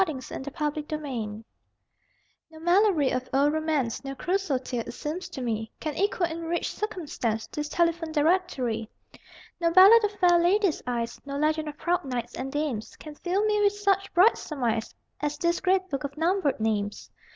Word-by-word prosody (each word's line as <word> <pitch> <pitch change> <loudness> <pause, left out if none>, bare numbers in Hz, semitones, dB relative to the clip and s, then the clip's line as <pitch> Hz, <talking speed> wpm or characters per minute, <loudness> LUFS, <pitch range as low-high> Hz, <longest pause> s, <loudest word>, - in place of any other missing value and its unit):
THE 320 -5 -3 0.4
TELEPHONE 300 0 -1
DIRECTORY 235 -8 -4 1.1
No 315 0 -13
Malory 345 -4 +3
of 255 0 -2
old 280 +2 +3
romance, 310 -7 -1
No 275 0 -5
Crusoe 360 -2 0
tale, 255 -1 -4
it - - -6
seems 325 +5 -5
to 260 - -6
me, 220 -2 -2
Can 310 -2 -3
equal 385 -2 +1
in 330 0 -5
rich 340 +1 -2
circumstance 295 - -3
This 295 0 -5
telephone 335 -1 0
directory. 295 - 0 0.7
No 335 -1 +2
ballad 390 +6 +8
of 415 0 0
fair 355 -3 +4
ladies' 370 0 +2
eyes, 235 -1 -3
No 280 0 -5
legend 310 +1 +1
of 295 - -10
proud 350 +2 0
knights 250 -3 -4
and 270 +1 -5
dames, 290 -7 -3
Can 305 - -10
fill 370 +7 -1
me 420 -1 +2
with 405 0 +4
such 395 -1 0
bright 380 +6 +5
surmise 235 -7 -2 0.2
As 295 0 -2
this 340 0 0
great 375 0 +2
book 275 -1 -2
of 280 +1 -6
numbered 330 -4 +1
names! 210 -2 -2
310 Hz, 175 wpm, -27 LUFS, 265-360 Hz, 1.1 s, ballad